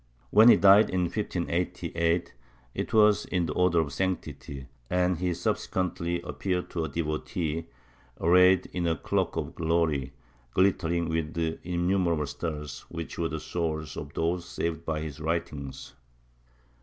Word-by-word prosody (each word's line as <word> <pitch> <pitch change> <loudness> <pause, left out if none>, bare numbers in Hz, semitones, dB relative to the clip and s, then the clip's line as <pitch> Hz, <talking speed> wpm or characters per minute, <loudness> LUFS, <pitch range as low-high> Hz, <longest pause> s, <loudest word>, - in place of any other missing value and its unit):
AVhen 110 +3 +8
he - - +9
died, 100 +2 +7
in 90 -2 0
15SS, 85 -3 -1 0.4
it - - -3
was 105 -2 +5
in 90 -2 0
the - - -3
odor 90 -2 +3
of 70 -3 -4
sanctity, 80 -7 -3 0.2
and 90 -1 +1
he 90 0 0
subsequently 85 0 -1
appeared 90 +6 -3
to 85 - -2
a 80 - -3
devotee 80 0 -2 0.5
arrayed 90 +2 +5
in 85 -1 -1
a 80 - +2
cloak - - -1
of - - -3
glory, 80 -5 0 0.4
glittering 85 -3 +2
with 80 -1 -2 0.3
innumerable 85 -2 +1
stars, 75 -2 -5
which 85 0 -6
were 85 -1 0
the 80 - -4
souls 80 -2 -3
of 75 -1 -6
those 85 +2 0
saved 85 -2 -3
by 80 -1 -2
his 80 -1 -6
writings. 80 -4 -4
85 Hz, 140 wpm, -28 LUFS, 80-90 Hz, 0.5 s, he